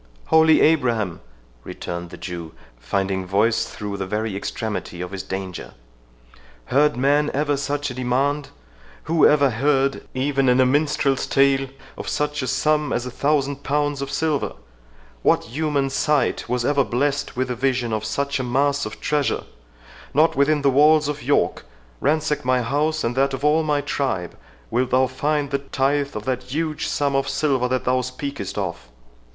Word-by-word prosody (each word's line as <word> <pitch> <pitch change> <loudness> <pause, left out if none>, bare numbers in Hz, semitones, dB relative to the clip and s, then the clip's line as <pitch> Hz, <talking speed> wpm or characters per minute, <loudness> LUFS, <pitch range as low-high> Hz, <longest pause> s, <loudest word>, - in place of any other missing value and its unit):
"Holy 160 -1 +5
Abraham!" 120 - +2 0.4
returned 85 0 -6
the - - -10
Jew, 85 -3 -7 0.3
finding 95 +9 -1
voice 100 +5 +1
through 105 -1 -6
the 95 -1 -4
very 105 +1 -2
extremity 100 -3 -4
of 90 +1 -5
his 95 -1 -4
danger, 95 -2 -6 1.0
"heard 145 -1 +4
man 145 +3 +2
ever 145 0 +1
such 145 0 -2
a - - -6
demand?—Who 130 - -1
ever 145 -3 +4
heard, 135 +3 +1
even 135 0 +1
in 125 +1 +4
a 130 - +6
minstrel's 140 0 +1
tale, 135 0 +3 0.3
of - - -4
such 150 0 -1
a 130 - -3
sum 150 +3 +1
as 120 - -1
a 125 - -5
thousand 140 0 0
pounds 145 0 -1
of 140 - -4
silver?—What - - -2
human 140 +1 -1
sight 150 -2 0
was 125 -1 0
ever 140 0 +3
blessed 140 +2 -1
with 130 0 0
the 125 - -2
vision 125 -2 0
of 110 -1 -1
such 140 +6 -1
a - - -1
mass 140 +2 +1
of 110 - -9
treasure?—Not 125 - -2
within 140 +1 +2
the 140 - +4
walls 150 +2 +5
of 150 0 -4
York, 145 +3 +1 0.4
ransack 150 +1 0
my 125 -1 +2
house 150 +5 0
and 115 +1 -1
that 135 0 +2
of 135 - -4
all 155 +2 +4
my 150 -2 0
tribe, 110 -13 -2 0.4
wilt 125 +1 +1
thou 130 +1 +4
find 145 +2 -1
the 140 - 0
tithe 140 +1 -1
of 105 0 -5
that 130 -1 -1
huge 155 +4 -2
sum 140 -1 0
of 135 - 0
silver 135 -3 +1
that 130 0 -1
thou 130 0 +2
speakest 130 -6 -5
of." 85 -11 -4
135 Hz, 165 wpm, -22 LUFS, 115-145 Hz, 1.0 s, a